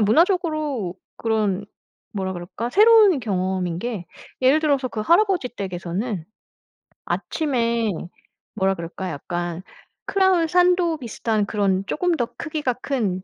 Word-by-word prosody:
정말 - - +3
문화적으로 305 - +1 0.2
그런 210 -3 0 0.5
뭐라 190 -2 -2
그럴까? 185 +7 -5
새로운 420 - +6
경험인 185 -4 -1
게 215 -7 -4 0.4
예를 275 +4 +5
들어서 280 -4 +1
그 225 - -4
할아버지 350 - +3
댁에서는 185 -1 -4 0.8
아침에 235 -7 0 0.7
뭐라 195 -2 +1
그럴까 175 +2 -5
약간 175 +3 -4 0.4
크라운 380 -4 +3
산도 355 -1 +3
비슷한 225 -4 -1
그런 195 -3 0
쪼금 355 +1 +1
더 240 - 0
크기가 305 -6 -2
큰 220 -8 -2
230 Hz, 280 characters per minute, -23 LUFS, 190-315 Hz, 0.8 s, 새로운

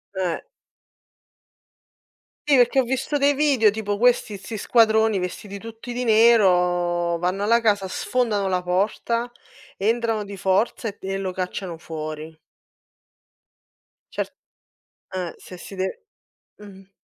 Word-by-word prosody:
Eh. 185 -3 -1 2.1
Sì, 280 - +6
perché 245 +1 +4
ho - - +4
visto 265 +4 -1
dei 285 0 +3
video 275 -6 +4
tipo 205 -1 -3
questi 235 -3 +2
'sti 200 +4 -8
squadroni 220 -1 +3
vestiti 195 +2 -6
tutti 225 +3 -9
di 245 +1 -3
nero, 180 -6 +3
vanno 180 +3 -1
alla 230 +3 +4
casa, 205 -4 +1
sfondano 215 -2 0
la 185 -1 0
porta, 215 +6 0 0.5
entrano 225 +1 0
di 200 -1 -9
forza 195 +5 0
e 205 - -6
e 195 0 -3
lo 190 -1 -3
cacciano 180 -1 -4
fuori. 155 -1 -7 1.8
Cer - - -1 0.9
eh, 180 -3 -3
se 180 - -11
si 195 - -10
de 190 0 0 0.7
mh. 195 -2 -14
200 Hz, 125 wpm, -23 LUFS, 185-230 Hz, 2.1 s, Sì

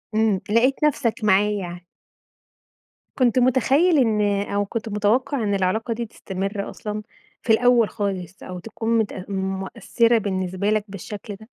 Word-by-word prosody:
إمم. 215 -3 +2
لَقيت 255 +7 +2
نفسك 245 -6 +1
معاه 210 0 +4
يعني. 180 -3 -5 1.3
كنت 255 -1 +3
متخيل 270 +7 +3
إن 220 -5 +3 0.3
أو 205 0 0
كنت 225 +1 -4
متوقع 220 +5 +1
إن 205 -1 0
العلاقة 220 +5 0
دي 235 +1 -4
تستمر 195 0 -4
أصلًا 210 0 -5 0.4
في 225 - +3
الأول 240 -1 +4
خالص 190 -3 -4
أو 180 -1 -7
تكون 225 +3 -2
متأ 205 -4 -2
مؤثرة 195 +5 0
بالنسبة 190 -1 -1
لك 215 -1 +2
بالشكل 200 +1 -7
ده؟ 220 +2 -14
210 Hz, 140 wpm, -23 LUFS, 195-230 Hz, 1.3 s, معاه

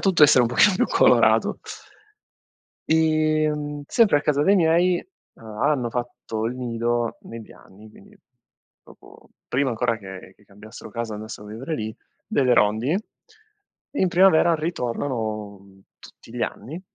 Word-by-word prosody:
tutto 190 -5 +2
a - - +12
essere 130 -4 +5
un 115 - +1
pochino 185 - +4
più - - +1
colorato. - - +3 1.3
Ehm, 155 -2 0
sempre 215 -11 +3
a - - -5
casa 145 -1 +1
dei 200 +6 +4
miei, 175 +1 +2 0.3
uhm, 115 - -18 0.2
hanno 130 -6 +1
fatto 120 -2 -5
il 120 - -3
nido, 120 -1 -2
negli 115 -1 -11
anni, 105 +3 -17
quindi - - -19 0.7
proprio - - -18 0.2
prima 135 +1 0
ancora 115 0 -1
che 95 -1 -11
che 105 - -26
cambiassero 105 +3 -13
casa, 115 0 -5
andassero 105 0 -9
a - - -10
vivere 130 +8 -5
lì, 110 0 -5 0.3
delle 130 -3 +2
rondini. 110 - +2 1.0
In 190 - +2
primavera 175 -2 +4
ritornano, 115 - -4
mhmm, 95 -1 -20 0.2
tutti 115 - -16
gli - - -2
anni, 160 +8 -5
125 Hz, 145 wpm, -23 LUFS, 110-155 Hz, 1.3 s, a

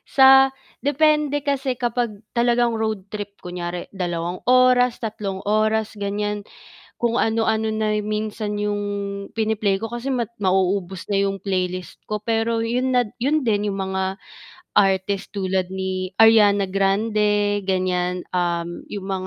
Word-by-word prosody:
sa 270 0 +8 0.3
depende 295 0 +2
kasi 275 -2 0
kapag 235 -4 -2
talagang 240 0 +2
road 215 -3 -3
trip, 205 -1 -5
kunyari 175 0 -5
dalawang 175 -1 -3
oras, 250 -1 +5
tatlong 210 -4 -4
oras, 215 +1 +1
ganiyan. 205 +1 -2 0.6
Kung 235 -1 +1
ano-ano 220 0 +1
na 215 -1 0
minsan 210 0 -3
'yong 205 0 -1 0.5
pini-play 215 -3 0
ko 225 - -2
kasi 240 +3 -4
ma 240 -2 0 0.2
mauubos 190 -1 0
na 200 - +2
'yong 195 0 -1
playlist 185 -2 -3
ko, 210 0 -3
pero 225 0 0
'yun 250 +3 0
na 250 - +5 0.2
'yun 300 +4 +2
din 210 -2 +1
'yung 195 - -4
mga 190 0 -2 0.6
artist 195 0 +1
tulad 190 -2 -1
ni 190 -1 -3
Ariana 210 -3 +6
Grande, 205 +1 +1
ganiyan, 180 -1 0
um, 175 -1 -1
'yong 200 -2 -5
mga, 190 -1 -3
210 Hz, 135 wpm, -22 LUFS, 190-230 Hz, 0.6 s, sa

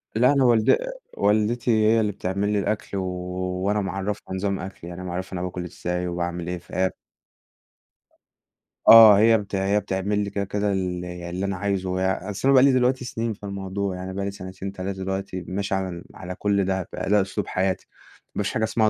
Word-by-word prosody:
لأ 125 +5 +5
أنا 140 -2 +3
والد 115 -3 +5 0.4
والدتي 110 +4 +2
هي 110 +1 +4
اللي 105 -2 +1
بتعمل 100 +1 -2
لي 105 - +2
الأكل 100 0 -2
و 95 - -1 0.6
وأنا 105 +1 +1
معرّفها 95 0 -4
نظام 100 0 -1
أكلي. 90 -2 -8
يعني 90 +1 -7
أنا 90 - -5
معرّفها 90 +2 -5
أنا 90 - -3
باكل 90 0 -4
إزاي 90 +1 -3
وباعمل 85 0 -3
إيه، 90 0 -2
فهي 95 +2 -1 2.0
آه، 110 -3 +11
هي 115 +1 +6
بت 100 -1 -5
بتعمل 100 +1 0
لي 100 - -3
كده، 100 0 -2
كده، 100 +1 -1
ال 90 -2 -2
اللي 90 +1 -5
أنا 100 -1 -2
عايزه. 95 -2 -1 0.3
أصل 105 +6 -2
أنا 140 - +6
بقى 130 -1 +7
لي 140 - +6
دلوقتي 125 0 +2
سنين 115 -2 -2
في 105 - -18
الموضوع، 100 -1 -3
يعني 95 +1 -6
بقى 100 0 -3
لي 100 - -2
سنتين، 95 0 -7
3 95 0 -5
دلوقتي 95 -1 -3
ماشي 100 +1 -2
على 95 -1 -1
ال 85 -1 -7
على 90 0 -7
كل 100 -2 +1
ده، 95 -1 -1
بقى 90 +2 -3
ده 105 -1 +5
أسلوب 95 - -3
حياتي. 95 0 -1 0.5
ما - - 0
فيش - - -2
حاجة 110 - 0
اسمها 110 0 +2
100 Hz, 195 wpm, -24 LUFS, 95-105 Hz, 2.0 s, آه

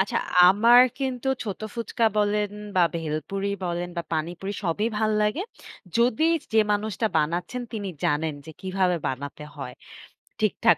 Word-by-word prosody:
আচ্ছা, 190 - +1 0.3
আমার 230 +5 +7 0.2
কিন্তু 265 -1 -2 0.2
ছোট 200 -4 -5
ফুচকা 235 0 -1
বলেন 210 0 +1 0.3
বা 180 - +6
ভেলপুরি 165 +5 -3 0.2
বলেন 175 0 -2
বা 170 - -1
পানিপুরি 175 +5 -2
সবই 180 +6 0
ভালো 215 -1 +1
লাগে। 210 - 0 0.6
যদি 245 +6 +3 0.3
যে, 220 - +6
মানুষটা 215 +1 -1
বানাচ্ছেন 175 +10 -1
তিনি 205 -3 -3 0.2
জানেন 150 +1 +1
যে, - - -7
কিভাবে 185 -1 +1
বানাতে 140 +3 -5
হয় 125 -3 -6 0.7
ঠিকঠাক - - +3
195 Hz, 140 wpm, -25 LUFS, 165-220 Hz, 0.7 s, আমার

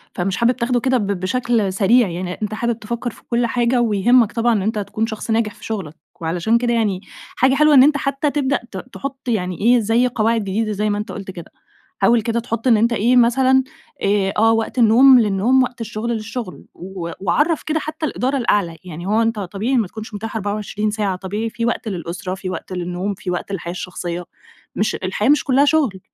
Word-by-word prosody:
فمش 180 +1 -1
حابب 235 +1 +3
تاخده 245 0 0
كده 260 +1 +1
ب 210 -4 -2
بشكل 200 +2 0
سريع 225 +4 +4
يعني، 180 +1 -4
أنتَ 210 0 -2
حابب 235 +1 -2
تفكر 235 +3 -4
في - - -18
كل 240 0 +1
حاجة 240 +1 +1
ويهمك 230 +1 +3
طبعًا 235 0 +1
إن 210 - +1
أنتَ 215 +2 -1
تكون 215 +2 -2
شخص 220 0 -5
ناجح 220 -2 +1
في - - -13
شغلك. 190 -9 -5 0.3
وعلشان 175 +7 +1
كده 240 0 0
يعني، 210 -5 0 0.3
حاجة 265 +1 +3
حلوة 300 +1 +5
إنّ 260 -2 +8
أنتَ 290 +1 +4
حتّى 275 +1 -1
تبدأ 275 -2 0
ت 190 - -6 0.2
تحط 275 -1 -7
يعني 185 -7 -1
إيه 240 +3 +5
زي 230 +3 +2
قواعد 230 -1 +1
جديدة 215 +2 -2
زي 210 +1 -1
ما 205 - 0
أنتَ 210 +2 -5
قُلت 195 -2 -7
كده. 170 -3 -11 0.5
حاول 235 -1 +4
كده 230 +1 -1
تحط 230 +1 -3
إنّ 230 -3 +5
أنتَ 230 +2 +2
إيه، 235 +3 +2
مثلًا، 260 +2 +4 0.4
آآ، 195 -1 +1
آه 225 +1 +5
وقت 225 +3 -1
النوم 245 +3 +7
للنوم، 225 +5 +3
وقت 250 -1 -5
الشغل 225 +1 -4
للشغل، 225 -2 -5
و 180 -2 -7
وعَرَّف 295 - +1
كده 315 0 -1
حتّى 310 +1 -4
الإدارة 270 -1 -1
الأعلى، 200 -9 0
يعني 175 -1 -8
هو 215 +3 +2
أنتَ 225 -1 0
طبيعي 205 +7 -1
ما 225 -5 +1
تكونش 220 +3 -9
متاح 220 +2 -6
24 210 0 -2
ساعة، 205 -3 -1
طبيعي 205 +5 -4
في 230 +1 -3
وقت 235 -1 -2
للأسرة، 180 -1 -4
في 190 -1 -6
وقت 185 +1 -6
للنوم، 180 +2 -3
في 185 -1 -5
وقت 180 +2 -4
للحياة 170 -3 -4
الشخصية، 175 -1 -5 0.5
مش 210 - 0
الحياة 190 +5 -1
مش 295 0 +4
كلها 275 +1 +3
شُغل. 285 -10 +1
220 Hz, 205 wpm, -20 LUFS, 195-245 Hz, 0.5 s, إنّ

